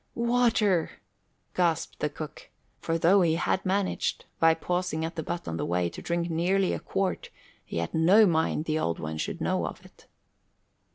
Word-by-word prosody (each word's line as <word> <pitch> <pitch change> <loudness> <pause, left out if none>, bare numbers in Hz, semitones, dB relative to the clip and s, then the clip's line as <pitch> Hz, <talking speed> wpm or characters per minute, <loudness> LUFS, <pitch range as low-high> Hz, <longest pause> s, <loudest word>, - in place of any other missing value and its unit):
"Water!" 235 -7 +2 0.6
gasped 170 -3 0
the 150 - 0
cook. 155 0 -9 0.3
For 165 0 -1
though 185 +4 +5
he 165 -2 +3
had 180 +2 0
managed, 195 0 -1
by 165 0 +5
pausing 175 -1 -2
at 165 - -6
the 160 - -2
butt 170 +2 -5
on 80 0 -3
his - - -2
way, 85 0 0
to - - -9
drink 170 0 -1
nearly 180 +3 +1
a - - -3
quart, 195 -1 -2 0.3
he - - -6
had 85 0 -2
no 185 +7 +6
mind 160 -3 +1
the 155 0 0
Old 85 - -1
One 80 0 -5
should - - -3
know - - 0
of - - -9
it. - - -19
170 Hz, 180 wpm, -27 LUFS, 160-190 Hz, 0.6 s, no